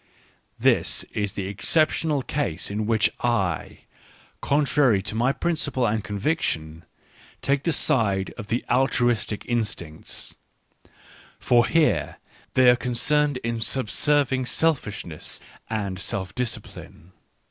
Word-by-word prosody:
This - - +2
is 105 -2 -1
the 100 -3 -4
exceptional 150 - +1
case 100 - -2
in 105 +1 -2
which 110 -3 +2
I, 110 -7 -1 0.6
contrary 140 -6 +3
to 100 - -2
my 120 +4 +2
principle 145 -5 0
and 110 -1 0
conviction, 90 - -2 0.6
take 140 0 +2
the 165 - 0
side 100 - +2
of 110 -4 -8
the 120 +2 -1
altru 125 -1 +3
istic 105 -2 -3
instincts; 105 -10 -3 1.1
for 120 -1 +3
here 165 -2 +2 0.4
they 130 -1 +7
are - - +4
concerned 135 +4 +1
in 115 0 -2
sub 120 -1 0
serving 135 -4 +2
selfishness 105 - -1 0.3
and 100 -4 -3
self 95 -3 -3
discipline. 110 -6 -6
120 Hz, 115 wpm, -24 LUFS, 100-135 Hz, 1.1 s, they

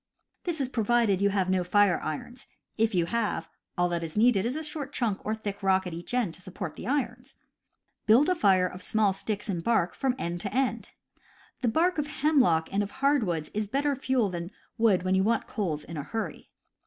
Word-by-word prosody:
(This 340 -3 -1
is 270 - 0
provided 230 -4 +2
you 200 - +4
have 195 -2 0
no 185 -1 +1
fire 200 0 +3
irons; 240 - -6 0.3
if 225 -2 +1
you 175 -2 +3
have, 230 +3 -1 0.3
all 175 0 +3
that 170 -1 -2
is 165 +3 -5
needed 220 -3 +4
is 250 - -2
a 315 - -3
short 295 -2 -5
chunk 220 -7 -1
or 215 - -1
thick 205 -2 -6
rock 190 -1 +2
at 180 - -5
each 175 +8 -4
end 235 -10 0
to 185 - -10
support 185 0 -6
the - - -7
irons.) 250 -1 -2 0.7
Build 235 +7 +6
a 365 - +4
fire 190 - +3
of 180 0 -6
small 210 -1 +2
sticks 205 +2 -4
and 175 -5 -2
bark 220 -5 +2
from 265 -2 0
end 175 -6 -3
to 200 - -4
end. 265 0 -1 0.7
The 250 - +1
bark 325 +8 +2
of 295 - -1
hemlock 275 - +2
and 200 - +2
of 200 - -2
hardwoods 210 - 0
is 210 0 -1
better 280 +5 0
fuel 260 -4 +1
than 170 -1 -5 0.3
wood 220 -6 +3
when 185 0 +1
you 190 - +3
want 230 +2 +1
coals 160 -8 -3
in 165 +1 -8
a 145 - -3
hurry. 225 +8 -5
210 Hz, 215 wpm, -28 LUFS, 185-250 Hz, 0.7 s, Build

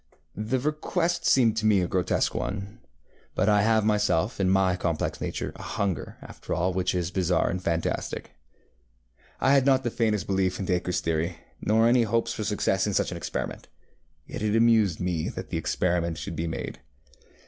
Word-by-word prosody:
ŌĆØ 105 +1 -5
The 130 +1 +2
request 165 +4 -1
seemed 115 -5 +4
to 110 -1 +1
me 105 -3 +5
a 90 - 0
grotesque 90 0 0
one; 100 +1 -4 0.6
but - - +1
I 105 -1 +5
have 110 0 +3
myself, 105 -1 +1
in 95 -1 +2
my 95 -1 +3
complex 85 -3 -2
nature, - - -3
a - - -10
hunger 100 -9 -3
after - - -6
all 90 +2 0
which 90 0 0
is 90 0 -1
bizarre 90 -2 +1
and 90 +1 -3
fantastic. 85 0 -2 1.1
I 135 - +4
had 140 -1 +4
not 135 -1 +4
the 120 - -1
faintest 110 -6 0
belief 95 -1 0
in 95 - -2
DacreŌĆÖs 90 0 0
theory, 85 +1 -1 0.2
nor 110 +2 +3
any 120 +1 +5
hopes 115 +1 0
for 110 - -4
success 100 -2 0
in 100 - -1
such - - +1
an 85 - -4
experiment; 85 - -5 0.6
yet - - -7
it 105 0 +1
amused 115 -6 +4
me 90 -3 -1
that - - -7
the - - -1
experiment 85 -2 0
should 85 - -5
be 80 +2 -2
made. 80 - -5
100 Hz, 185 wpm, -26 LUFS, 90-110 Hz, 1.1 s, me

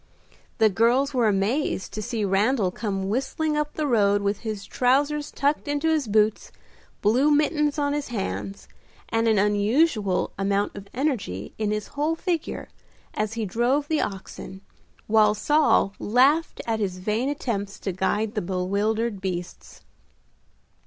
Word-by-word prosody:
The 220 -2 +4
girls 245 +8 +2
were 245 -4 +2
amazed 205 +3 0
to 215 - -4
see 225 -1 -2
Randal 200 +1 +2
come 195 -2 -3
whistling 285 +7 -1
up 300 0 -1
the 310 - -1
road 205 -6 +3
with 200 0 0
his 215 -3 -5
trousers 285 +4 +1
tucked 285 +2 -1
into 290 +2 0
his 310 -6 +1
boots, 215 0 +1 0.5
blue 245 +8 +4
mittens 300 0 +2
on 285 -1 0
his 295 -1 -2
hands, 100 - -4 0.4
and 225 0 +1
an 220 -2 +3
unusual 210 - +2
amount 200 +1 0
of 200 0 -9
energy 240 - -2
in 215 -1 0
his 210 0 -3
whole 300 +3 -1
figure, 335 -1 -3 0.5
as 215 0 -2
he 225 -1 -2
drove 245 +8 +1
the 315 -1 +1
oxen, 190 -1 -6 0.4
while 215 -1 +4
Saul 295 -5 +3
laughed 270 +9 +2
at 225 -1 -1
his 190 -3 -2
vain 215 +8 -1
attempts 205 -8 -3
to 195 - -2
guide 205 +4 -1
the 210 - -1
bewildered 200 +4 -1
beasts. 180 -2 -6
220 Hz, 145 wpm, -25 LUFS, 200-285 Hz, 0.5 s, The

